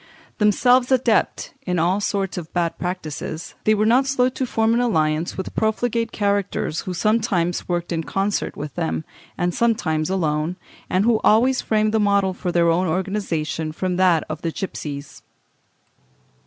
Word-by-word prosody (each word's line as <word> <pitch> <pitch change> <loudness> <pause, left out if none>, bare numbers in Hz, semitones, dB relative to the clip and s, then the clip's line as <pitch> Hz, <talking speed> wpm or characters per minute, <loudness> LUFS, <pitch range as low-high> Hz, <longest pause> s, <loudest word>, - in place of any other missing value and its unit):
Themselves 245 +5 +4
adepts 240 -4 +1
in 180 -1 -2
all 175 +4 +2
sorts 200 -2 -1
of 170 -3 -6
bad 170 -2 -1
practices, 165 -3 -5
they 215 - +4
were 215 +1 +1
not 250 +4 +4
slow 255 -2 +2
to 260 +1 -3
form 225 -1 +1
an 235 - +2
alliance 160 -8 0
with 190 - -5
profligate 230 +1 0
characters 200 -5 -1
who 185 - -4
sometimes 190 -4 0
worked 175 0 -2
in 165 -1 -1
concert 195 +4 -2
with 150 0 -6
them, 165 -2 -2 0.3
and 175 0 0
sometimes 160 -10 +1
alone, 160 -2 0 0.3
and 185 +3 +2
who 230 -2 +3
always 245 +4 +4
framed 215 0 +1
the 220 - +3
model 200 -2 +2
for 180 0 -3
their 170 -1 +3
own 180 +3 +1
organization 165 -4 -2
from 180 +3 -2
that 180 -4 +4
of 155 - -5
the 165 - -2
gipsies." 145 -6 -6
190 Hz, 160 wpm, -22 LUFS, 165-215 Hz, 0.3 s, Themselves